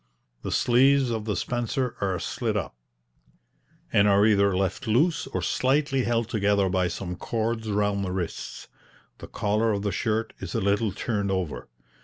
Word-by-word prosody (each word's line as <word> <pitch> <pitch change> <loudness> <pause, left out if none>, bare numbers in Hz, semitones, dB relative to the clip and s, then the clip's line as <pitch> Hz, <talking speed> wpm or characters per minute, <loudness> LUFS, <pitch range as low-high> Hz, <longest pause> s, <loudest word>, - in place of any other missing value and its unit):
The - - -4
sleeves 130 +1 +4
of 110 -2 -3
the 105 -2 -1
spencer 120 +1 -2
are 95 -2 0
slit - - -2
up, - - -4 1.2
and 100 0 +5
are 100 0 +5
either 100 -3 +3
left 95 +4 -2
loose 150 +11 +2
or 135 - -3
slightly 135 0 +1
held 115 -1 0
together 100 -4 +1
by 90 -1 +1
some 90 +1 -5
cords 110 +2 -2
round 100 -1 0
the 95 - -3
wrists; 90 -3 -5 0.5
the - - -9
collar 105 +2 0
of 100 -1 -2
the 100 - 0
shirt 110 +3 -1
is - - -6
a - - +2
little 100 +2 +1
turned 100 0 -2
over. 95 -5 -3
105 Hz, 165 wpm, -26 LUFS, 100-120 Hz, 1.2 s, and